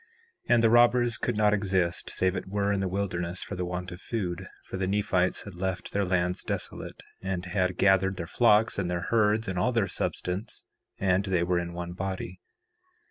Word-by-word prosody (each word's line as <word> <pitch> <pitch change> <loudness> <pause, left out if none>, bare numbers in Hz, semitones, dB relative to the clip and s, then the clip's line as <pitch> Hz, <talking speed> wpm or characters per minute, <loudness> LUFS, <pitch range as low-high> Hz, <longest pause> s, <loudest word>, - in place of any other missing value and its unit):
4:3 120 - +6
And 115 - +3
the 115 - +6
robbers 120 0 +4
could 120 -3 -1
not 105 -1 +4
exist 95 -4 0
save 95 +1 +1
it - - -4
were 100 +1 0
in 100 - 0
the 95 - 0
wilderness, 90 -2 -2
for 100 - -6
the 90 0 -2
want 90 0 -4
of 90 +1 -9
food; 95 -5 -3 0.2
for - - -6
the 95 0 -1
Nephites 95 -2 +1
had 100 - -9
left 90 0 -3
their 100 0 0
lands 90 0 0
desolate, - - -5 0.2
and 95 -1 -3
had 90 0 0
gathered 95 0 +3
their 85 - -4
flocks 110 +3 +3
and 90 -3 -1
their 85 -1 -2
herds 110 -1 +3
and 95 -1 -2
all 125 +8 +2
their 115 -5 +1
substance, 95 +6 -3 0.3
and 95 0 +2
they 90 -3 +1
were 90 0 +1
in 85 0 -5
one 85 0 -5
body. 95 -1 -5
95 Hz, 200 wpm, -28 LUFS, 90-105 Hz, 0.3 s, 4:3